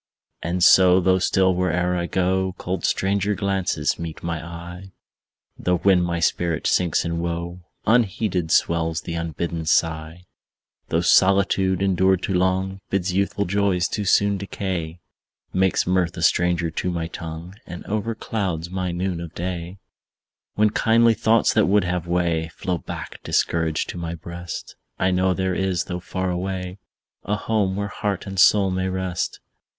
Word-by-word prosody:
And 85 Hz, +2 st, -1 dB
so, 90 Hz, 0 st, +7 dB
though 95 Hz, 0 st, +3 dB
still, 95 Hz, 0 st, +2 dB
where'er 90 Hz, 0 st, 0 dB
I 85 Hz, -1 st, -1 dB
go, 95 Hz, 0 st, 0 dB
Cold 95 Hz, +1 st, -4 dB
stranger 100 Hz, +1 st, +1 dB
glances 95 Hz, -3 st, -1 dB
meet 85 Hz, -2 st, -6 dB
my 85 Hz, -2 st, -3 dB
eye; 85 Hz, +3 st, -9 dB, 0.7 s
Though, 90 Hz, 0 st, +1 dB
when 95 Hz, 0 st, +4 dB
my 85 Hz, -1 st, -1 dB
spirit 85 Hz, 0 st, 0 dB
sinks 90 Hz, -3 st, +2 dB
in 85 Hz, 0 st, -2 dB
woe, 85 Hz, +1 st, -4 dB, 0.3 s
Unheeded 105 Hz, -6 st, +1 dB
swells 80 Hz, -1 st, +1 dB
the 85 Hz, -, -6 dB
unbidden 85 Hz, 0 st, -3 dB
sigh; 80 Hz, +2 st, 0 dB, 0.7 s
Though 80 Hz, -, +1 dB
solitude, 95 Hz, +1 st, +3 dB
endured 95 Hz, -1 st, +2 dB
too 95 Hz, -, -1 dB
long, 95 Hz, +1 st, 0 dB
Bids 95 Hz, -1 st, -1 dB
youthful 100 Hz, +1 st, 0 dB
joys 100 Hz, -1 st, +1 dB
too 105 Hz, -, -3 dB
soon 100 Hz, +1 st, +3 dB
decay, 90 Hz, -4 st, -4 dB, 0.5 s
Makes 95 Hz, 0 st, +2 dB
mirth 90 Hz, -1 st, 0 dB
a 85 Hz, -, -3 dB
stranger 85 Hz, -1 st, +2 dB
to 90 Hz, -, -2 dB
my 85 Hz, -2 st, -2 dB
tongue, 85 Hz, +1 st, -7 dB
And 85 Hz, 0 st, -8 dB
overclouds 100 Hz, -5 st, -3 dB
my 90 Hz, -1 st, -2 dB
noon 90 Hz, 0 st, -2 dB
of 85 Hz, 0 st, -8 dB
day; 90 Hz, +1 st, -4 dB, 0.8 s
When 105 Hz, 0 st, +3 dB
kindly 115 Hz, +1 st, +4 dB
thoughts 110 Hz, +1 st, +3 dB
that 110 Hz, -, +3 dB
would 100 Hz, +1 st, +3 dB
have 90 Hz, -1 st, -2 dB
way, 85 Hz, -2 st, 0 dB
Flow 90 Hz, -4 st, -2 dB
back -, -, -8 dB
discouraged 80 Hz, -2 st, 0 dB
to 90 Hz, -, -5 dB
my 85 Hz, 0 st, -4 dB
breast; 85 Hz, +1 st, -8 dB, 0.2 s
I 95 Hz, -, +1 dB
know 90 Hz, 0 st, +2 dB
there 95 Hz, -1 st, -1 dB
is, 95 Hz, -2 st, 0 dB
though 90 Hz, -1 st, -5 dB
far 95 Hz, +1 st, -3 dB
away, 90 Hz, +1 st, -4 dB, 0.4 s
A 105 Hz, -, -1 dB
home 105 Hz, -3 st, 0 dB
where 100 Hz, 0 st, -2 dB
heart 100 Hz, -1 st, -3 dB
and 95 Hz, -1 st, -4 dB
soul 100 Hz, -1 st, +5 dB
may 95 Hz, 0 st, -1 dB
rest. 95 Hz, -2 st, -3 dB
90 Hz, 155 wpm, -23 LUFS, 85-95 Hz, 0.8 s, so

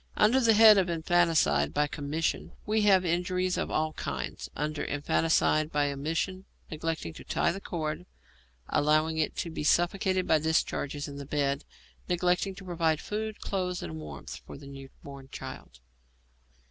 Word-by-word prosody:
Under 225 Hz, +5 st, +5 dB
the 230 Hz, -3 st, +4 dB
head 215 Hz, -1 st, +8 dB
of 185 Hz, -2 st, +1 dB
infanticide 160 Hz, -, +2 dB
by 150 Hz, -, +3 dB
commission, 150 Hz, +2 st, -2 dB
we 215 Hz, 0 st, +1 dB
have 195 Hz, -3 st, +5 dB
injuries 180 Hz, +2 st, 0 dB
of -, -, -2 dB
all 155 Hz, 0 st, 0 dB
kinds; -, -, -5 dB
under 150 Hz, +1 st, -2 dB
infanticide 155 Hz, +1 st, +1 dB
by 145 Hz, -1 st, +1 dB
omission, 165 Hz, +7 st, -3 dB, 0.3 s
neglecting 160 Hz, -, -3 dB
to -, -, -11 dB
tie -, -, +1 dB
the 195 Hz, +3 st, -6 dB
cord, 155 Hz, -, -4 dB, 0.6 s
allowing 155 Hz, +2 st, +2 dB
it 155 Hz, -, 0 dB
to 170 Hz, -, -3 dB
be 160 Hz, -, -4 dB
suffocated 185 Hz, +3 st, +2 dB
by 160 Hz, -, +4 dB
discharges 150 Hz, -2 st, -1 dB
in 140 Hz, -1 st, -8 dB
the 140 Hz, -, -7 dB
bed, 140 Hz, -1 st, -1 dB, 0.4 s
neglect 180 Hz, 0 st, +2 dB
to 195 Hz, 0 st, -8 dB
provide 165 Hz, -3 st, +1 dB
food, 215 Hz, +2 st, -4 dB
clothes, 180 Hz, -2 st, -2 dB
and 80 Hz, -1 st, -6 dB
warmth, 75 Hz, -3 st, -8 dB
for -, -, -9 dB
the 140 Hz, -, -12 dB
new 135 Hz, -1 st, -10 dB
born 140 Hz, -1 st, -10 dB
child. -, -, -9 dB
160 Hz, 160 wpm, -29 LUFS, 145-185 Hz, 0.6 s, head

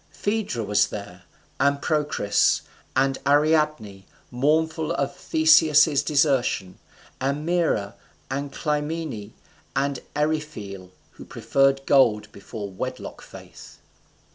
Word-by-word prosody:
Phaedra 205 Hz, -, -2 dB
was 105 Hz, 0 st, +2 dB
there, 95 Hz, -3 st, -9 dB, 0.3 s
and 140 Hz, 0 st, +2 dB
Procris, 150 Hz, -10 st, +1 dB, 0.3 s
and 135 Hz, 0 st, +1 dB
Ariadne, 145 Hz, -9 st, +1 dB, 0.3 s
mournful 160 Hz, +5 st, 0 dB
for 140 Hz, -, +1 dB
Theseus's 155 Hz, -1 st, +4 dB
desertion, 140 Hz, -, 0 dB, 0.4 s
and 140 Hz, +3 st, -2 dB
Maera, 170 Hz, -, 0 dB, 0.3 s
and 140 Hz, +1 st, -4 dB
Clymene, 150 Hz, -7 st, -3 dB, 0.4 s
and 140 Hz, -1 st, 0 dB, 0.2 s
Eryphile, 150 Hz, -12 st, -3 dB, 0.2 s
who -, -, -13 dB
preferred 135 Hz, 0 st, +1 dB
gold 110 Hz, -6 st, +3 dB
before 100 Hz, +1 st, -8 dB
wedlock 95 Hz, -, -6 dB
faith. -, -, -13 dB
140 Hz, 95 wpm, -24 LUFS, 110-155 Hz, 0.4 s, Theseus's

